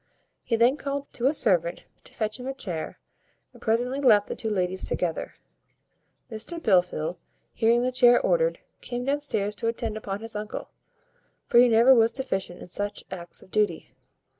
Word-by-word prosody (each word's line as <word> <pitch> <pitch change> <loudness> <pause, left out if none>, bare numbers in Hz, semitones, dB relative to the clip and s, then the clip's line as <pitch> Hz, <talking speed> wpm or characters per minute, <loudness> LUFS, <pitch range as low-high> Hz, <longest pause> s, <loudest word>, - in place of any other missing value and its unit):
He 230 - -1
then 240 +5 +4
called 280 -1 -5
to 245 - +1
a - - +4
servant - - +1 0.2
to - - -12
fetch 215 +2 -2
him 250 - -7
a 270 - -4
chair, 175 -11 -5 0.6
and - - -17
presently 245 +4 0
left 215 -6 +5
the - - -5
two 225 - -3
ladies 185 -2 -1
together. 170 -3 -2 1.0
Mr 225 +10 -3
Blifil, 180 - +1 0.4
hearing 235 +2 +3
the 255 - 0
chair 245 -1 +5
ordered, - - +1 0.2
came 245 0 -5
downstairs 275 -8 -1
to 230 - -2
attend 230 -2 -2
upon 200 -1 -5
his 225 -1 -8
uncle; 210 +1 -6 0.7
for 240 - +4
he 245 - +7
never 235 +3 +6
was 230 -2 +4
deficient 190 -9 -3
in - - -11
such 205 +3 -4
acts 175 -2 -7
of 185 - -20
duty. 210 -1 0
230 Hz, 170 wpm, -26 LUFS, 205-255 Hz, 1.0 s, he